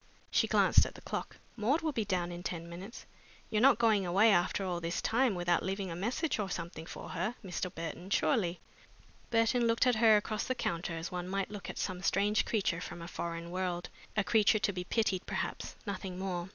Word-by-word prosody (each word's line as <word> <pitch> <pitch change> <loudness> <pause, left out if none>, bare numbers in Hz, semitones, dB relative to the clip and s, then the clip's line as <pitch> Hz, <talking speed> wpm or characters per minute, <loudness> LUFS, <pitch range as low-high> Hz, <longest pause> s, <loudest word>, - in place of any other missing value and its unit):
She - - +3
glanced - - +5
at - - -10
the - - -11
clock. - - -5 0.2
"Maud 250 +8 +1
will 320 -1 0
be 225 -6 -1
down 180 -3 -1
in 175 0 -6
ten 170 -2 -4
minutes. 185 +7 -9 0.5
You're 215 - +2
not 270 0 +7
going 220 -4 +3
away 195 +5 +5
after 190 +1 +2
all 175 -2 -1
this 170 +1 -2
time 240 -2 +2
without 175 -1 +2
leaving 190 -1 -3
a - - -4
message 235 - -1
or 200 -2 -1
something 170 -2 -5
for - - -8
her, 190 +7 -2
Mr. 180 0 -3
Burton, 170 +2 -6
surely?" 195 -5 +1 0.7
Burton 230 +1 +3
looked 230 +2 +3
at 250 -3 +3
her 220 -1 +7
across 210 0 -2
the 255 - -1
counter 170 -5 -2
as 165 +1 -5
one 180 0 -4
might 195 +1 -1
look 200 -4 -7
at - - -6
some 185 -2 -3
strange 205 +3 +2
creature 190 -6 0
from 175 - -7
a 170 - -7
foreign 170 -1 -5
world, 180 -1 -2 0.3
a 210 - +4
creature 220 0 +4
to 205 -1 0
be 180 -1 -3
pitied, 195 -3 0
perhaps, - - -3
nothing 190 -2 -4
more. 185 -1 -3
190 Hz, 210 wpm, -32 LUFS, 175-220 Hz, 0.7 s, not